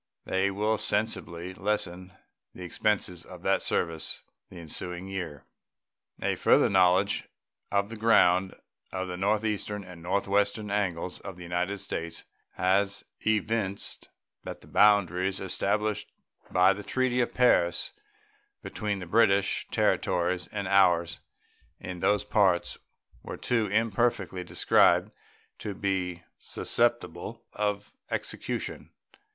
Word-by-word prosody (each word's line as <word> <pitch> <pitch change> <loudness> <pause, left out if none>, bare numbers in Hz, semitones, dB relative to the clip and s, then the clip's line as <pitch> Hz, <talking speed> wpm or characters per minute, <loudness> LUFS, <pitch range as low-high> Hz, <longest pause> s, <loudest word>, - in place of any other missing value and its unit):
They 95 +1 +1
will 105 +2 0
sensibly 95 -4 -1
lessen 95 -2 -2 0.4
the 90 - -8
expenses 90 -1 -1
of - - -12
that - - +2
service 80 -3 -1 0.3
the 90 - -12
ensuing 90 +2 -6
year. 90 -7 -5 0.8
A - - +2
further - - +4
knowledge 95 +1 +3 0.4
of 100 0 +1
the - - -5
ground 95 -4 +4 0.4
in 95 0 -3
the 90 - -4
northeastern 105 +1 -1
and 90 -2 -12
northwestern 100 +3 0
angles 90 -3 -1
of 95 -2 -8
the 90 - -9
United 90 +3 -2
States 85 0 -5 0.3
has 100 +2 +1 0.2
evinced 110 -2 -1 0.3
that - - -8
the - - -16
boundaries 95 -2 +3
established 100 +3 -1 0.4
by 90 +2 +5
the 100 - -7
treaty 125 +2 +1
of 120 - -2
Paris 85 -9 +3 0.7
between 105 -2 -3
the 95 - -6
British 100 0 +3
territories 90 +1 +1
and 100 -2 -3
ours 85 -3 +3 0.6
in 90 -1 -6
those 105 +2 +2
parts 100 -4 +2 0.5
were - - -7
too 115 -3 0
imperfectly 105 -3 0
described 90 - +3 0.5
to 105 -2 -5
be 90 -3 -2 0.2
susceptible 115 -2 -1
of 105 0 -2 0.2
execution. - - -4
95 Hz, 115 wpm, -28 LUFS, 90-105 Hz, 0.8 s, by